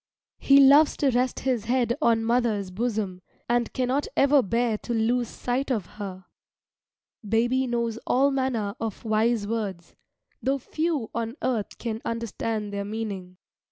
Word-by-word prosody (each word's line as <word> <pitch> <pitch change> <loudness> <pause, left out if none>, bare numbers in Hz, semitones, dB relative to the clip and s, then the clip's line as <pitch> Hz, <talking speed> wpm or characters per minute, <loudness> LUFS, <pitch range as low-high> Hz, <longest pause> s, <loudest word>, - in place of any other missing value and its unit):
He 275 0 +6
loves 280 +3 +6
to 280 -2 +2
rest 250 +1 0
his 245 -5 0
head 240 0 +1
on 230 -5 +3
mother's 225 -5 +1
bosom, 205 -3 -2 0.3
and 240 -1 +1
cannot 260 +3 0
ever 280 0 +5
bear 230 0 0
to 240 - -3
lose 235 +2 +1
sight 255 +5 -2
of 220 -8 0
her. 190 -3 -8 1.0
Baby 240 +5 +1
knows 235 -2 -1
all 275 +3 +3
manner 255 -7 -1
of 225 0 -5
wise 220 0 +1
words, 200 -6 -4 0.5
though 270 +1 +1
few 305 -2 -2
on 230 +1 -3
earth 230 -5 -1
can 225 -1 -4
understand 225 -2 -3
their 200 0 -2
meaning. 200 -4 -5
230 Hz, 145 wpm, -26 LUFS, 215-255 Hz, 1.0 s, He